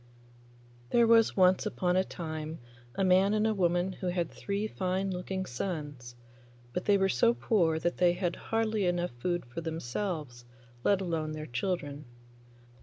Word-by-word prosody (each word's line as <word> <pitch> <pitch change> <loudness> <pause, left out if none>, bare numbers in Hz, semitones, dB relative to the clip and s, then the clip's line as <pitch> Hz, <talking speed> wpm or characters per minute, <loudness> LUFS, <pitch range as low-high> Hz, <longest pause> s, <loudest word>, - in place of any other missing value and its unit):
There 235 - +4
was 225 -2 +4
once 185 0 +5
upon 180 -3 0
a 185 - +4
time 160 -3 -5 0.4
a 195 - 0
man 190 +2 +4
and 215 0 +2
woman 175 0 +1
who 185 0 -5
had 175 -2 -1
three 200 +1 -3
fine 190 -1 -1
looking 190 +1 -3
sons, 145 -4 -5 0.6
but 180 - -3
they 205 -1 +5
were 195 0 +3
so 120 -7 +3
poor 160 - +2
that 175 +2 -1
they 175 -1 +4
had 175 -1 -1
hardly 220 -3 0
enough 175 0 0
food 175 +3 -1
for 120 +7 -6
themselves, 160 -4 -4 0.4
let 200 -1 +3
alone 160 -4 -2
their 155 0 -5
children. 145 +1 -3
180 Hz, 155 wpm, -30 LUFS, 155-195 Hz, 0.6 s, once